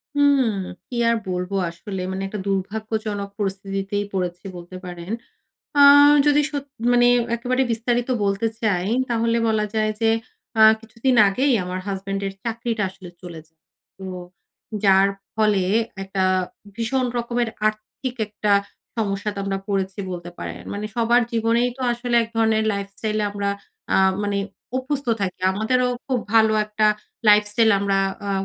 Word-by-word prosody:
হুম। 285 -1 +4 0.5
কি 245 - -6
আর 230 - +3
বলবো? 180 +2 -2
আসলে 185 +3 -6
মানে 190 +1 -3
একটা 205 +1 -5
দুর্ভাগ্যজনক 205 +1 -2
পরিস্থিতিতেই 195 +1 -2
পড়েছি 180 0 -3
বলতে 175 +1 -10
পারেন। 175 +1 -7 0.7
আ - - +7 0.5
যদি 295 0 +5
সত 285 -1 -3 0.3
মানে 245 0 +5 0.3
একেবারে 255 +2 0
বিস্তারিত 240 +2 0 0.2
বলতে 200 +2 0 0.2
চাই, 185 -4 +1 0.2
তাহলে 230 0 +1
বলা 215 -1 +1
যায় 215 0 +1
যে, 225 -1 +3 0.5
আ - - +8 0.2
কিছুদিন 230 +3 -1
আগেই 265 +8 +1
আমার 180 +1 -4
হাসব্যান্ডের 195 0 -3
চাকরিটা 230 -1 -2
আসলে 185 -2 -12
চলে 170 -3 -8
যায়। 160 - -42 0.4
তো 190 - -8 0.8
যার 195 0 +6 0.3
ফলে 210 -3 +2 0.4
একটা 195 0 -2 0.5
ভীষণ 250 +3 0
রকমের 240 0 -1 0.2
আর্থিক 215 +4 -3
একটা 210 0 -1 0.4
সমস্যাতে 205 -1 -2
আমরা 195 0 -1
পড়েছি 195 -1 -1
বলতে 175 -1 -6
পারেন। - - -6
মানে 205 +1 -4
সবার 235 +1 +4
জীবনেই 230 +2 +2
তো 265 - -6
আসলে 240 0 -3
এক 225 - -6
ধরনের 220 -1 +2
লাইফস্টাইলে 200 +2 -3
আমরা 200 0 -2 0.5
আ - - +5 0.3
মানে 205 -1 -1 0.4
অভ্যস্থ 265 +1 -2
থাকি। 185 -2 -3
আমাদেরও 250 +5 +1 0.2
খুব 260 -2 0 0.2
ভালো 220 -1 +5
একটা 215 0 +1 0.4
লাইফস্টাইল 210 +2 +5
আমরা 195 -1 +1 0.3
আ - - 0
210 Hz, 140 wpm, -22 LUFS, 195-230 Hz, 0.8 s, আ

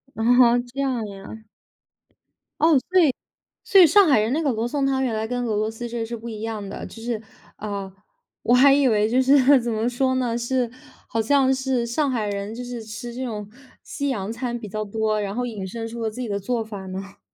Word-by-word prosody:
哦， 225 - -3 0.5
这 275 - -6
样 255 -5 -1
呀。 200 +3 -10 1.2
哦， 315 -1 +5
所 370 0 +5
以 295 -6 +4 0.5
所 390 - +6
以 355 - +10
上 400 +5 +6
海 275 -7 +5
人 220 +3 0
那 315 +4 0
个 285 -4 +1
罗 225 0 -2
宋 280 +2 -1
汤， 270 -1 +1
原 245 -4 0
来 220 0 -2
跟 245 +1 -2
俄 215 - -1
罗 215 +1 0
斯 235 +2 -6
这 235 -1 -3
是 235 +1 -5
不 235 +1 -8
一 215 -1 -7
样 220 -2 -4
的， - - -7
就 225 - -11
是 230 -2 -2 0.4
嗯， 200 -2 -5 0.5
我 240 - +3
还 270 +2 +7
以 275 -1 +4
为 215 -2 +2
就 250 +3 +3
是， 270 0 +5
怎 235 -1 -2
么 220 +2 0
说 260 +1 0
呢， 245 -2 0
是 240 0 -1 0.4
好 225 - -1
像 265 +3 +3
是 260 -2 -1
上 275 +5 0
海 230 -4 -1
人 200 +1 -4
就 245 - -6
是 245 -2 -6
吃 225 +2 -7
这 260 +2 -4
种 210 -4 -5 0.3
西 285 - -4
洋 205 -5 -3
餐 240 0 -3
比 220 -3 -8
较 215 +2 -3
多， 215 +1 -1
然 200 -1 -3
后 245 +2 -2
引 210 -5 -5
申 225 +4 -5
出 230 0 -6
了 220 - -1
自 215 - -8
己 245 - -3
的 200 -1 -1
做 230 +4 -2
法 210 -3 -8
呢。 195 +1 -7
235 Hz, 250 characters per minute, -23 LUFS, 215-260 Hz, 1.2 s, 以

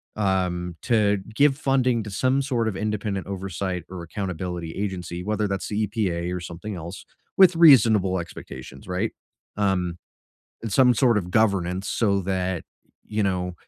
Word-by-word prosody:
um, 90 -4 -1
to 105 -4 +3 0.2
give 140 +2 +4
funding 130 -4 +1
to 105 - -7
some 130 +7 +1
sort 120 -5 0
of 100 -4 -2
independent 105 -2 -2
oversight 95 -2 -4
or 90 -2 -7
accountability 90 -2 -4
agency, 90 -3 -4
whether 105 +1 0
that's 100 -1 -3
the 105 0 0
EPA 90 -5 -2
or - - -3
something 85 +5 -7
else, 85 +2 -8 0.3
with 185 -2 +7
reasonable 110 - +6
expectations, 80 -4 -9
right, 95 +4 -1 0.5
um, 90 -4 0 0.7
and 115 -3 -4
some 125 0 +5
sort 120 -2 +3
of 90 -3 -5
governance 95 -3 +1
so 100 -4 +1
that, 95 -2 -1 0.4
you 105 0 -1
know, 90 -2 -1
100 Hz, 150 wpm, -24 LUFS, 90-110 Hz, 0.7 s, with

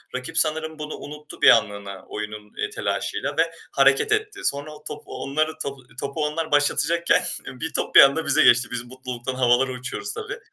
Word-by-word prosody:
Rakip 130 0 -5
sanırım 160 0 0
bunu 150 0 -5
unuttu 150 +1 -10
bir - - +8
anlığına 100 -4 +1
oyunun, 105 0 -7
eee, 430 - -2
telaşıyla 430 - -3
ve - - +2 0.2
hareket 450 -1 +3
etti. 425 -2 -1
Sonra 150 - -2
o 150 - -16
top 150 0 -7
onlar 140 +4 -2
topu 140 -1 -6 0.2
topu 140 +2 -2
onlar 160 +1 -3
başlatacakken 145 +3 +2 0.2
bir 145 +5 -6
top - - -2
bir - - +12
anda 140 +4 +4
bize 145 - +4
geçti. 120 +1 +5
Biz 125 0 -3
mutluluktan 130 0 -6
havalara 130 +1 +3
uçuyoruz 130 - -5
tabii. 445 +1 -6
145 Hz, 175 wpm, -23 LUFS, 125-160 Hz, 0.2 s, bir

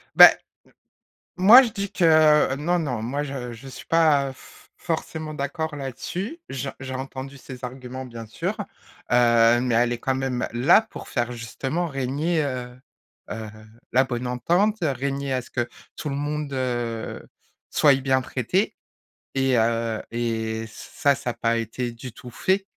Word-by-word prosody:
Bah, - - +12
m - - -8 1.0
moi 210 +8 +10
je 250 - 0
dis 200 -2 -4
que - - -1 0.5
heu, - - 0
non, 170 +5 0
non 125 -9 -2
moi 135 +5 -2
je 135 -4 -5
je 120 +4 -11
suis 130 -1 -10
pas 150 -5 +3
f - - -17
forcément 160 -2 -4
d'accord 150 +2 -3
là-dessus, 170 - -5
j 135 +1 -4
j'ai 130 0 -5
entendu 135 +1 -6
ses 130 -1 -11
arguments 130 +1 -6
bien 115 -2 -8
sûr, 110 - -3 0.5
heu, 120 -1 +5
mais 125 -2 +1
elle 120 +1 +3
est 120 - -5
quand 130 +2 0
même, 130 -2 -2
heu, 120 - -5
là 135 - +6
pour 220 - -11
faire 120 -1 -1
justement 135 +8 -3
régner, 145 +4 -1
heu 125 -3 -4 0.6
heu, 110 0 -5 0.4
la 130 +2 +5
bonne 125 -1 -3
entente, 180 - +1
heu, 155 - +2
régner 140 +1 -2
à 130 - +1
ce 120 - -14
que 120 -2 -1 0.3
tout 150 - -4
le 140 - -3
monde, 145 0 -3
heu, 120 -3 -3 0.4
soit 145 -2 +5
bien 130 0 +2
traité. 130 - -1 0.6
Et, 135 -2 +2
heu, 115 -1 0
et 115 -1 -2
ça 140 +5 0
ça 135 -2 -4
a - - -5
pas 115 0 0
été 120 +2 -3
du 120 +1 -9
tout 125 +2 -11
fait. 190 +10 0
130 Hz, 170 wpm, -24 LUFS, 120-145 Hz, 1.0 s, Bah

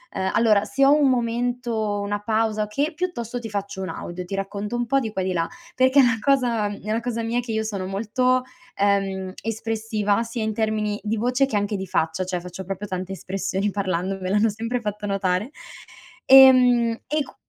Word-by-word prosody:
Uhm, 190 0 0
allora 215 -3 +4
se 215 +7 +1
ho 280 - +6
un 285 -3 +4
momento, 235 -3 -1
una 205 +1 -2
pausa 215 -1 0
che 285 +10 -1
piuttosto 250 -10 -3
ti 225 - -6
faccio 200 -1 -4
un 190 - -4
audio, 175 +2 -6
ti 195 +2 -5
racconto 200 +3 -4
un 240 - -1
po' 275 +4 +2
di 220 -4 -4
qua 190 - -2
e - - -2
di 185 - -1
là, 165 -2 0 0.3
perché 260 +2 +4
è - - +8
una 235 -2 +2
cosa 245 -6 +2
è 205 0 -6
una 225 +2 0
cosa 230 -1 -3
mia 235 +2 0
che 240 -1 -6
io 220 0 0
sono 195 -4 -3
molto, 250 +6 +1 0.3
ehm, 195 -2 0
espressiva 220 -1 -1
sia 230 0 -4
in 220 0 -1
termini 215 -1 -1
di 220 +1 -1
voce 250 +4 +2
che 230 -6 -1
anche 205 +1 -1
di 190 -1 -4
faccia, 160 +4 0
cioè 180 -1 -3
faccio 180 +2 -8
proprio 195 +2 -5
tante 185 0 -4
espressioni 195 +1 -2
parlando 190 -1 -2
me 185 - -3
l'hanno 210 +3 +3
sempre 230 +4 -3
fatto 210 -2 -4
notare, 195 +3 0 0.8
ehm, 250 -3 +7
e 305 - 0
q - - -15
215 Hz, 205 wpm, -23 LUFS, 195-235 Hz, 0.8 s, è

